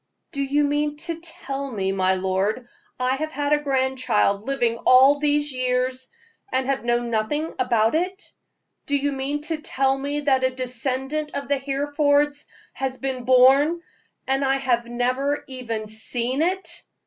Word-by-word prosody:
"Do 280 -4 -2
you 285 +2 +1
mean 295 +1 0
to 330 +2 -4
tell 280 -4 -5
me, 195 -5 -1
my 190 -1 +2
lord, 190 +6 -1 0.3
I 255 +1 +1
have 310 +2 -3
had 290 -1 0
a 295 - +2
grandchild 260 -7 +1
living 240 -4 0
all 265 +4 +6
these 295 0 +1
years, 255 0 -1 0.4
and 260 0 0
have 270 -1 -1
known 240 0 0
nothing 295 +9 -1
about 230 -3 +2
it. 365 +5 -2 0.5
Do 285 - +2
you 285 +1 0
mean 275 +2 -3
to 320 +1 -2
tell 270 -2 +1
me 285 +2 -3
that 270 -3 +2
a 260 - +4
descendant 260 +4 -3
of 280 - -4
the 285 -1 +2
Herefords 285 +1 +1 0.3
has 265 -1 -3
been 260 -2 -4
born, 270 +7 +5 0.4
and 270 +1 0
I 270 0 +2
have 245 -3 0
never 255 +4 -1
even 235 -5 -5
seen 235 +5 -2
it? 375 +3 -2
270 Hz, 160 wpm, -23 LUFS, 250-290 Hz, 0.5 s, all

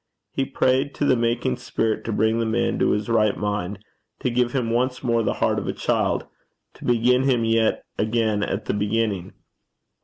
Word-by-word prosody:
He 135 - -1
prayed 130 +2 +1
to 145 - 0
the 130 - +4
making 115 - 0
Spirit 110 -1 -1
to 115 - -2
bring 110 +2 +1
the 115 - 0
man 115 +2 0
to - - +3
his 105 0 0
right 110 -3 +2
mind, 105 -1 -3 0.4
to 125 - 0
give 120 0 +1
him 120 -4 -1
once 125 +2 0
more 115 -2 +2
the - - 0
heart - - +1
of - - -6
a - - -1
child, - - 0 0.5
to - - -12
begin 120 +1 +3
him 125 -4 +2
yet 115 0 +2 0.2
again 110 -1 +1
at 105 0 -2
the - - -1
beginning. 105 -2 -1
115 Hz, 190 wpm, -23 LUFS, 105-120 Hz, 0.5 s, the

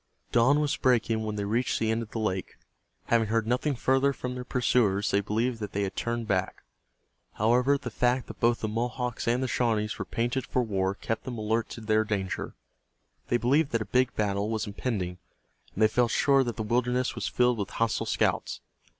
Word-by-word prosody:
Dawn 125 +5 +4
was 150 -1 +1
breaking 115 -3 +2
when 110 -1 -3
they 100 -1 -2
reached 115 +5 0
the 110 0 0
end 110 +1 0
of 115 - -7
the - - -6
lake. 95 -4 -2 0.5
Having 115 -2 +2
heard 115 0 +1
nothing 125 +5 0
further 135 +3 +2
from 125 -1 -5
their 125 0 -5
pursuers 115 -5 +1
they 100 - +3
believed 115 +4 -1
that 105 -2 -5
they 100 - 0
had 95 - -3
turned 120 -1 -2
back. 95 -2 -1 0.7
However, 125 +6 +3
the 125 -3 -7
fact 125 +2 +1
that - - -11
both 120 0 +2
the 110 - -1
Mohawks 120 +2 -3
and 120 +2 +2
the - - 0
Shawnees 110 -4 0
were - - -3
painted 120 +3 -2
for 125 - +1
war 95 -3 -1
kept 115 +2 -3
them 125 -2 -5
alert 110 +1 -1
to 115 - -8
their 110 0 +2
danger. 100 -4 -3 0.7
They 120 - +2
believed 140 +5 +2
that 115 - +1
a - - -14
big 125 +3 +1
battle 100 0 0
was 110 -1 -1
impending, 100 -4 -3 0.6
and 110 - +2
they - - +7
felt 120 +2 +2
sure 135 +3 +3
that 120 - -3
the 110 - -3
wilderness 125 +3 0
was - - -3
filled 125 -2 +2
with 100 - -2
hostile 115 -2 -1
scouts. - - 0
115 Hz, 205 wpm, -28 LUFS, 105-125 Hz, 0.7 s, they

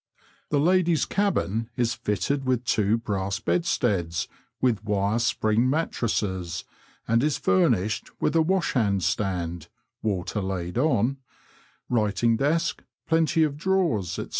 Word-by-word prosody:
The 145 - +2
ladies' 175 0 +3
cabin 115 - 0
is 120 -2 +1
fitted 110 +8 -1
with 125 -2 0
two 105 0 +2
brass 100 -3 -2
bedsteads 100 - 0 0.3
with 115 -6 +1
wire 105 +1 0
spring 115 +1 +1
mat 160 +4 0
tresses, 95 -7 -2 0.4
and 115 +1 +3
is 150 -1 +1
furnished 95 +2 +1
with - - +1
washhandstand 100 - 0 0.3
(water 100 -1 -2
laid 95 +1 -3
on), 130 -2 +2 0.7
writing 115 0 +1
desk, 165 +5 0 0.2
plenty 160 0 +3
of 145 -2 -1
drawers, 165 - 0
&c. - - -4
115 Hz, 115 wpm, -25 LUFS, 100-145 Hz, 0.7 s, ladies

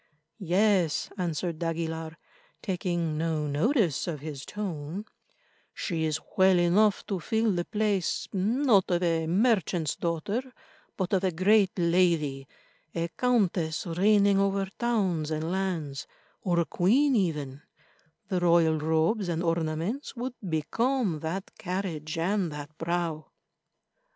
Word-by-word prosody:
"Yes," 185 -3 +2
answered 170 -3 -2
d'Aguilar, 165 -1 -3 0.5
taking 175 -4 -1
no 160 -2 -1
notice 165 - +1
of 155 -5 -4
his 145 -3 -7
tone, 185 -2 -5 0.7
"she 165 -4 -2
is 155 -1 -1 0.2
well 190 -1 +5
enough 190 +4 +3
to 195 -3 -2
fill 220 +6 +1
the 175 -1 -1
place, 210 -4 0
not 210 +1 +3
of 175 0 +1
a 165 -2 +1
merchant's 185 - +1
daughter, 170 +7 -2 0.6
but 190 0 -2
of 190 -1 +2
a 190 - +2
great 195 +3 +3
lady—a 170 -2 -1
countess 185 -8 0
reigning 200 +3 +3
over 195 0 +1
towns 195 -10 0
and 160 +1 -2
lands, 175 -7 -2 0.3
or 175 -2 +1
a - - 0
queen 255 - +3
even; 150 - -1 0.7
the 185 -2 0
royal 170 -2 +4
robes 160 +6 +1
and 170 0 -1
ornaments 165 - -2
would 245 +1 -4 0.2
become 200 - 0
that 170 +5 -5
carriage 175 -4 -3
and 180 +1 0
that 150 +1 -8
brow." 165 -2 -2
175 Hz, 120 wpm, -28 LUFS, 160-200 Hz, 0.7 s, well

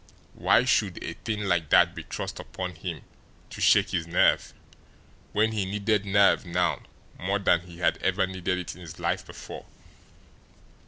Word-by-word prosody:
Why 125 - +3
should 105 -8 +1
a 85 - -4
thing 105 +4 -4
like 90 -6 0
that - - +5
be - - -7
thrust - - -6
upon 90 -1 -6
him 85 -2 -6 0.5
to - - -8
shake - - +4
his 85 -3 -1
nerve 85 - +3 0.8
when 110 +2 +2
he 105 -3 -1
needed 100 +1 0
nerve 100 0 +4
now 90 0 0 0.4
more 95 +3 0
than 95 -4 +2
he 85 -1 -12
had 90 - +1
ever 95 0 +1
needed 95 -1 -2
it 90 -2 -5
in 90 - -14
his 85 -3 -10
life - - -1
before? - - -10
95 Hz, 165 wpm, -27 LUFS, 85-100 Hz, 0.8 s, that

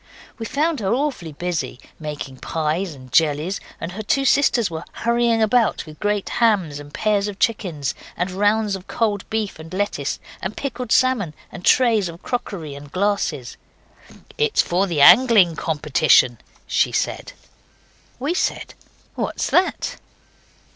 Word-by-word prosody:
We 225 - -4
found 310 +1 0
her 195 -2 -1
awfully 255 - -2
busy, 160 -6 -3 0.2
making 150 -4 -6
pies 160 +4 -2
and 130 -2 -14
jellies, 155 - +2 0.2
and 170 - -5
her 205 +4 -6
two 275 +6 +1
sisters 255 -4 +3
were 160 0 -5
hurrying 235 -1 +2
about 225 -2 +2
with 155 -1 -12
great 205 -1 0
hams, 195 -11 +1
and 145 0 -11
pairs 210 +1 +1
of 205 -1 -6
chickens, 180 - -1 0.2
and 180 +1 -1
rounds 205 +2 +1
of 190 0 -10
cold 210 -3 -1
beef 215 -6 -2
and 160 +1 -10
lettuces, 185 -7 -2 0.2
and 190 +3 -4
pickled 250 -4 -4
salmon 225 -13 +2 0.2
and 180 - -9
trays 225 -7 +4
of 170 +1 -11
crockery 185 - -4
and 140 0 -11
glasses. 185 -10 -1 0.8
'It's 450 -1 +3
for 185 +3 +1
the 165 -5 0
angling 190 - +7
competition,' 150 -6 +3 0.3
she - - +1
said. - - -2 0.8
We 280 +7 -1
said, 365 - -2 0.4
'What's - - -2
that? 370 +1 +1
195 Hz, 145 wpm, -21 LUFS, 155-225 Hz, 0.8 s, angling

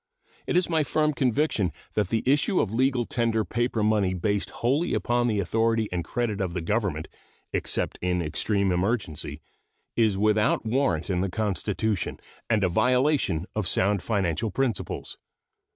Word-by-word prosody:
It - - 0
is 180 0 +3
my 160 -2 +2
firm 150 +1 +1
conviction 130 - +1 0.2
that 105 -4 0
the 115 -1 0
issue 145 - +3
of 105 - 0
legal 130 0 +2
tender 115 -2 0
paper 120 -1 -1
money 105 -3 +2
based 100 +2 -1
wholly 140 +9 0
upon 120 0 +1
the 105 -3 +1
authority 115 +3 +1
and 90 -1 -1
credit 110 +2 -2
of 90 -2 -2
the 90 - -1
Government, 95 -4 -1 0.5
except - - -1
in 90 0 0
extreme 95 +5 0
emergency, 90 -6 -2 0.5
is 110 -4 +2
without 105 +2 +2
warrant 110 - 0
in 90 -1 +1
the 95 - 0
Constitution 105 -1 -1 0.3
and 110 -3 +2
a - - +4
violation 125 - +2
of 110 -4 -1
sound 100 +2 +2
financial 100 0 0
principles. 120 +1 -3
110 Hz, 150 wpm, -26 LUFS, 95-120 Hz, 0.5 s, a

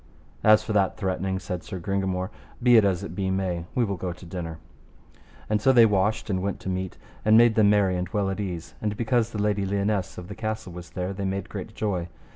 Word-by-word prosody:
As 110 0 +6
for 110 - -3
that 100 -2 +2
threatening, 95 -1 -1
said 90 -1 -4
Sir 95 - -6
Gringamore, 95 +1 -1 0.3
be 120 -1 +6
it 110 - +7
as 95 -3 +1
it 85 - -6
be 95 +1 -1
may, 95 -3 -1
we 125 - +3
will 100 -3 -3
go 90 +1 -3
to 90 +1 -11
dinner. 85 -2 -5 0.9
And 105 -1 +1
so 135 - +5
they 120 -3 +7
washed 105 0 +1
and 95 -3 -1
went 100 +1 -2
to - - -4
meat, 95 0 -3 0.3
and 110 +1 +6
made 120 0 +6
them 110 -2 +5
merry 100 -3 +3
and 90 0 -2
well 100 -3 0
at 95 - -4
ease, 90 -5 -4
and 105 -1 -2
because 120 -1 +1
the 110 - -6
Lady 105 -1 +1
Lionesse 100 0 -1
of 90 - -7
the - - -6
castle 110 -4 -4
was 90 -1 -9
there, 90 +4 -3
they 100 +1 -5
made 95 +1 -3
great - - -7
joy. 95 -5 -1
95 Hz, 235 wpm, -26 LUFS, 90-105 Hz, 0.9 s, it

